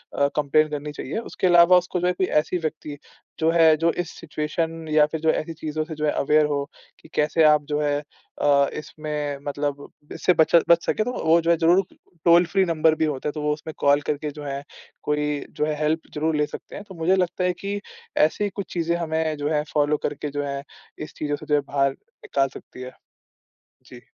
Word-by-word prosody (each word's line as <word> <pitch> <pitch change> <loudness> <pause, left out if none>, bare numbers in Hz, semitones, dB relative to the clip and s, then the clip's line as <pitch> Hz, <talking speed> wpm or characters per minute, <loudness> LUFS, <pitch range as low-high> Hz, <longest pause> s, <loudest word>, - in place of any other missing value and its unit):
अ, 140 - +3
complain 150 +1 +2
करनी 150 0 -5
चाहिए। 145 +4 -5
उसके 205 -4 -2
अलावा 175 +1 +7
उसको 180 0 -1
जो 180 - 0
है 180 - +2
कोई 185 +1 0 0.2
ऐसी 180 - -3
व्यक्ति, 155 -3 -5 0.4
जो 160 0 +2
है, 165 -2 +6
जो 165 +2 +2
इस 175 -1 -4
सिचुएशन 160 +1 -3
या 150 -1 +5
फिर 160 - -3
जो 160 - +2
ऐसी 165 +1 -3
चीज़ों 155 0 -3
से 160 0 -8
जो 150 0 -2
है 150 - +2
अवेयर 150 +2 +3
हो 145 -1 -1 0.4
कि - - -18
कैसे 155 +2 +2
आप 150 -1 +5
जो 150 - +1
हैं 145 0 0 0.4
अ, 140 -1 +4
इसमें 150 -1 -4
मतलब 145 0 -3 0.3
इससे 180 - +2
बच 160 0 +3
बच 170 0 +5
सकें। 215 - +1
तो 250 - -2
वो 165 +1 +5
जो 165 - +2
है 170 - +3
ज़रूर 175 +4 +4 0.4
टोल-फ्री 175 +3 +5
नंबर 160 -2 +2
भी 160 - +1
होता 145 -2 -3
है, - - -3
तो 150 - -6
वो 150 - 0
उसमें 155 +1 -8
कॉल 145 0 +4
करके 150 +1 -3
जो 150 0 -9
है, 140 0 -4 0.4
कोई 150 -1 -1
जो 150 - +1
है 155 0 -1
हेल्प 155 +1 +1
ज़रूर 155 +1 0
ले 150 - +2
सकते - - -10
हैं। - - -7
तो, 195 -2 -13
मुझे 170 +3 +2
लगता 180 0 -1
है 180 - +2
कि 200 +3 -4 0.4
ऐसी 200 +7 +2
कुछ 200 0 -7
चीज़ें 170 -1 0
हमें 160 -2 -1
जो 145 +1 -2
हैं, 150 -1 +1
फ़ॉलो 150 0 +2
करके 150 0 -3
जो 145 0 -3
हैं, 140 -1 -4 0.4
इस 155 - -7
चीज़ों 145 -1 -2
से - - -11
जो 150 - +2
हैं, 145 - +1
बाहर 140 -1 +1
निकाल 135 0 -3
सकती 125 - -13
है। 130 0 -7 1.0
जी। - - -12
155 Hz, 220 wpm, -23 LUFS, 145-165 Hz, 1.0 s, अलावा